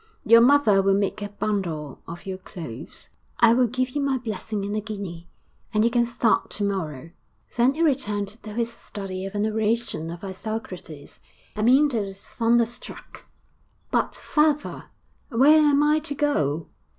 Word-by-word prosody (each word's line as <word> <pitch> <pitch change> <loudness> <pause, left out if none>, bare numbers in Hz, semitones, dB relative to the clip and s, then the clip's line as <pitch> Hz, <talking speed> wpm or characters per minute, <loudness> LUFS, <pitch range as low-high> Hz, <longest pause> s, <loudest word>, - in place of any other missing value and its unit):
Your 230 0 +8
mother 240 -6 +5
will 195 0 +3
make 200 +1 -1
a 205 - -4
bundle 175 -9 -3
of 170 +1 -9
your 190 -1 -5
clothes; 165 -10 -9 0.3
I 230 -1 +6
will 250 0 +3
give 255 +2 -1
you 290 - -2
my 275 -1 +1
blessing 215 -3 -4
and 205 +1 -3
a 215 - -1
guinea, 195 -6 -7 0.5
and 215 +1 +4
you 235 - +2
can 240 0 +2
start 235 -1 +1
to 205 - -4
morrow.' 165 -6 -3 0.4
Then 245 +3 +3
he 330 - +1
returned 210 -9 0
to 215 0 -10
his 235 0 -1
study 195 -4 -6
of 195 - -9
an 205 +1 +1
oration 220 -5 -1
of 170 +2 -8
Isocrates. 190 -6 -7 0.4
Amyntas 245 +2 +3
was 195 0 -8
thunder 235 0 +2
struck. 240 +1 -10 0.7
'But, - - 0
father, 300 -1 0 0.4
where 280 +5 +6
am 295 -1 +4
I 300 +1 +3
to 300 -2 -5
go?' 165 - 0
215 Hz, 160 wpm, -24 LUFS, 195-245 Hz, 0.7 s, Your